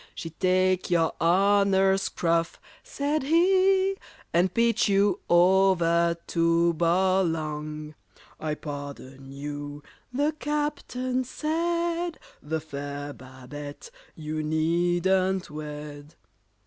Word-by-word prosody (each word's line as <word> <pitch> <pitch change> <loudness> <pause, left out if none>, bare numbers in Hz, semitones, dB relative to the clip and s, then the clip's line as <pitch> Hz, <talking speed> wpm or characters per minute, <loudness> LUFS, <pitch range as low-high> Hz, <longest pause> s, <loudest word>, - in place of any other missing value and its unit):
"She'd 165 -1 -8
take 185 0 +2
your 165 -2 +2
honour's 195 +2 +3
scruff," 165 -3 -1 0.2
said 305 -11 -2
he 380 +5 +3 0.4
"And 175 +2 +3
pitch 230 0 +2
you 200 -1 +3
over 175 -2 +4
to 170 0 +2
Bolong!" 160 -4 0 0.5
"I 155 -1 -2
pardon 140 -2 -8
you," 145 +1 -7 0.3
the 290 +4 +1
Captain 280 -4 -2
said, 335 +4 -1 0.2
"The 160 +2 -3
fair 145 -1 -6
BABETTE 140 - -10 0.2
you 155 0 -4
needn't 175 +4 +1
wed." 150 0 -8
175 Hz, 90 wpm, -26 LUFS, 150-205 Hz, 0.5 s, over